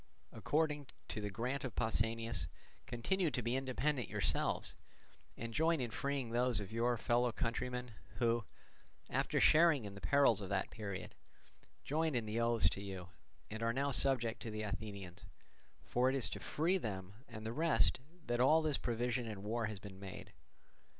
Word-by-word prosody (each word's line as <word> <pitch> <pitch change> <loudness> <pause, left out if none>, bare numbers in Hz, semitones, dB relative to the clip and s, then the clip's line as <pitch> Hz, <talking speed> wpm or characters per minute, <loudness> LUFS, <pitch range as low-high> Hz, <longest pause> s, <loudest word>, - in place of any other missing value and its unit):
According, 150 -2 0 0.2
to 110 - -3
the 105 - -2
grant 125 +7 -2
of 125 -6 -4
Pausanias, 115 -5 0 0.4
continue 170 +9 0
to 125 -2 -1
be 120 +2 0
independent 135 -1 0
yourselves, - - 0 0.6
and 115 0 -5
join 160 +3 +3
in 120 -3 -2
freeing 140 -3 -2
those 120 -1 +3
of 100 0 -6
your 120 +1 +1
fellow 120 +2 +2
countrymen 125 +2 -2 0.2
who, 115 -2 +2 0.7
after - - +1
sharing 155 -6 +6
in 100 - -6
the 100 - -10
perils 140 -7 +4
of 95 - -5
that 95 -1 -1
period, 100 -4 -5 0.7
joined 155 0 0
in 120 -2 0
the 110 +2 -1
oaths 115 0 +4
to 100 - -5
you, 95 -3 -6 0.4
and 110 +1 -5
are 115 0 +1
now 140 +3 0
subject 120 -4 +2
to 115 - -4
the 110 0 -3
Athenians; 100 -3 -6 0.6
for 125 +1 +2
it 135 - 0
is 135 - 0
to - - -4
free 175 +5 +1
them 95 - -4
and 110 -2 -8
the 110 - -2
rest 160 0 +3 0.3
that 120 0 0
all 155 +5 +6
this 150 -3 +1
provision 120 0 -1
and 105 -3 -6
war 110 +1 -1
has 110 -1 -5
been 95 -1 -10
made. 95 -1 -8
120 Hz, 170 wpm, -37 LUFS, 110-135 Hz, 0.7 s, sharing